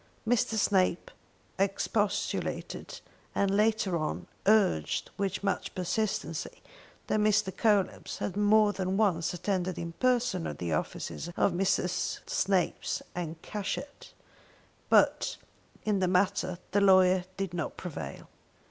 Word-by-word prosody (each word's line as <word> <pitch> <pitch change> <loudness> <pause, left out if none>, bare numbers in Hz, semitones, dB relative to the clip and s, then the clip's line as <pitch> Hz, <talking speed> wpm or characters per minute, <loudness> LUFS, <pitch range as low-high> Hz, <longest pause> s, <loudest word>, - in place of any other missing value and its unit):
Mr. 225 -1 +2
Snape, 185 -4 +2 0.5
expostulated, 200 +1 -1 0.3
and, 200 -1 +2
later 210 -3 +2
on, 155 -2 -2 0.2
urged 200 - +2
with 195 -1 -2
much 200 -1 -2
persistency, 215 - -2 0.4
that 215 - +1
Mr. 210 -2 +2
Coelebs 205 -4 +1
had 195 - -3
more 210 0 +4
than 190 0 -1
once 180 -7 +2
attended 180 0 -2
in 170 0 -4
person 245 -8 +1
at - - -5
the 85 -2 -2
office 150 - -3
of 195 - +3
Messrs. 180 0 0
Snape 190 -3 +1 0.3
and 170 -2 -4
Cashett. 215 +7 -5 0.8
But - - +3 0.5
in 210 -2 +2
this 185 -1 +2
matter 185 -1 +1
the 205 +2 +3
lawyers 185 -2 +5
did 195 -2 -3
not 170 -3 -3
prevail. 145 - -7
195 Hz, 120 wpm, -29 LUFS, 180-210 Hz, 0.8 s, lawyers